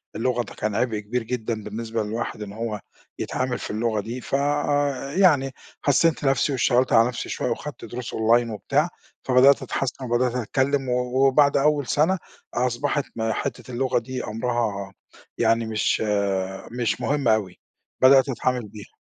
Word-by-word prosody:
اللغة 120 +1 0
ده - - -11
كان 105 -1 -3
عبء 115 -4 0
كبير 115 +3 -3
جدًا 115 -2 -3
بالنسبة 110 +1 -3
للواحد، 110 0 -4
إن 100 -1 -6
هو 110 -2 -4 0.4
يتعامل 130 -1 -2
في - - -5
اللغة 110 0 0
دي. 120 +5 -6
ف - - -2
آآ 145 -1 0
يعني 145 -9 +4 0.3
حسّنت 150 +2 +2
نفسي، 135 +1 +2
واشتغلت 130 -1 +2
على 115 +1 +6
نفسي 125 - -5
شوية، - - -2
وخدت - - -5
دروس 120 0 -6
أونلاين 115 +2 +3
وبتاع، 140 - 0 0.3
فبدأت 130 0 +5
أتحسن 130 0 -3
وبدأت 120 +1 +1
أتكلم 130 +2 0
و 125 +2 +2
وبعد 140 +1 +4
أول 145 -1 +2
سنة، 160 +6 +2 0.4
أصبحت 125 +4 0
م 110 -1 -1
حتّة 125 +2 -4
اللغة 125 +1 +1
دي 125 +2 -5
أمرها 110 -4 -2 0.4
يعني 115 0 +2
مش 110 -1 0 0.7
مش 120 -2 -1
مهم 145 -3 0
أوي، 105 -5 +1 0.4
بدأت 135 +1 +6
أتعامل 125 -2 -1
بيها. 105 0 -13
125 Hz, 155 wpm, -24 LUFS, 115-135 Hz, 0.7 s, على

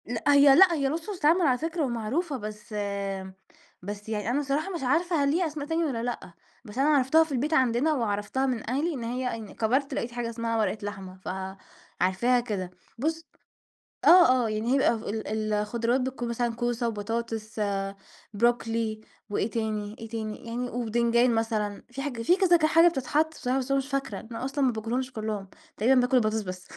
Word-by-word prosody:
لأ، 230 0 -4
هي 280 -1 +7
لأ، 360 +2 +7
هي 280 -4 +1
وصفة 335 +7 -4
تتعمل 335 +2 +3
على 265 -7 +3
فكرة 325 +3 -2
ومعروفة، 265 +6 -2
بس 210 0 -8 1.1
بس 205 +3 -7
يعني 210 -1 -2
أنا 260 +4 +1
الصراحة 290 +6 -1
مش 335 - -4
عارفة 320 +4 +2
هل 280 - +2
ليها 345 +2 +1
أسماء 295 -1 -6
تانية 325 +1 0
والّا 240 -6 -2
لأ، 240 -7 -5 0.3
بس 210 +1 -10
أنا 275 +3 +3
عرفتها 295 +2 +5
في 320 - -9
البيت 280 +4 -1
عندنا 260 +2 +3
وعرفتها 225 +1 -1
من 245 -4 -2
أهلي، 295 +7 0
إن 255 -5 -5
هي 250 +1 -2
إن 220 -3 -9
كبرت 260 +5 0
لقيت 235 - -3
حاجة 240 -1 -3
اسمها 230 0 -2
ورقة 220 0 0
لحمة، 195 -2 -7
فعارفاها 190 +4 -1
كده. 200 -7 -4 0.3
بُص 320 +6 -2 0.8
آه، 260 -9 +7
آه. - - -1
يعني 215 +3 -1
هي - - +4
ب - - +2
ف 220 - -8
ال 220 +1 -4
ال 215 0 -2
الخضراوات 230 +4 0
بتكون 255 -2 -3
مثلًا 235 0 -1
كوسة 240 0 -1
وبطاطس، 225 0 -4 0.7
بروكلي 230 -1 0 0.3
وإيه 205 +1 -1
تاني، 215 -2 -3
إيه 225 - -8
تاني؟ 220 +1 -5
يعني 240 +2 -3
وبتنجان 235 +1 +2
مثلًا، 215 -2 -1
في 270 +2 -5
حاجة 255 -5 -4
في 350 +10 +4
كذا 375 -3 +5
ك 315 -2 +2
حاجة 330 +2 +6
بتتحط 310 0 0
بصراحة 255 -3 -1
بس 265 0 -4
أنا 275 - +3
مش 270 0 -3
فاكرة. 275 -8 -3
أنا 230 +2 -7
أصلًا 275 +1 0
ما 255 - +3
باكلهمش 240 +4 -3
كُلّهم، 215 -4 -4 0.3
تقريبًا 250 +4 +4
باكل 250 +1 +2
البطاطس 220 -2 +2
بس. 185 -2 -6
240 Hz, 190 wpm, -27 LUFS, 220-280 Hz, 1.1 s, هي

